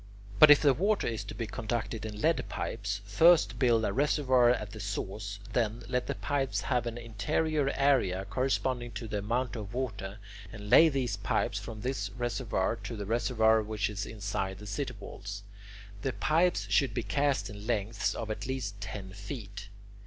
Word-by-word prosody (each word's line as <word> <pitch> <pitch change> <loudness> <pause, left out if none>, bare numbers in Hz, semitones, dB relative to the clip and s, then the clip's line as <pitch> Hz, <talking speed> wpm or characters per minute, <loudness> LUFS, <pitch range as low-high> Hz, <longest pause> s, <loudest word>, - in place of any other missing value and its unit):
But 155 - +10
if 150 +1 +8
the 140 -2 +6
water 200 - +1
is 115 -2 -2
to - - -7
be 115 - -3
conducted 110 0 -3
in 105 -1 -7
lead 165 +4 +2
pipes, 100 -2 -3
first 135 +3 +5
build 115 -4 +3
a 100 - -1
reservoir 130 -3 +3
at 105 -4 0
the 110 - -9
source; 100 0 -4 0.2
then, 115 0 0
let 125 0 -1
the - - -2
pipes 140 -2 -1
have 125 -2 0
an 115 0 -4
interior 135 +7 0
area 120 -10 +2
corresponding 130 -2 -1
to 105 +2 -5
the 105 -1 -2
amount 120 +5 -1
of 105 0 -6
water, 100 -6 -3 0.3
and 105 -1 -8
lay 165 - +8
these 135 -4 -1
pipes - - 0
from 110 -2 -8
this 125 -5 -2
reservoir 115 -4 -1
to 115 - -6
the 105 -2 -5
reservoir 110 0 +3
which 105 0 -2
is 100 -1 -4
inside 100 -3 -3
the 105 - -10
city 105 +7 -3
walls. 100 0 -7 0.6
The 130 - -1
pipes 170 +7 +2
should 135 -6 +2
be 120 - -1
cast 140 +7 +1
in 105 0 -9
lengths 110 -2 0
of 110 -1 -4
at 110 - -4
least 110 -7 -4
ten 95 -1 -6
feet. 100 0 -8
115 Hz, 180 wpm, -30 LUFS, 105-130 Hz, 0.6 s, But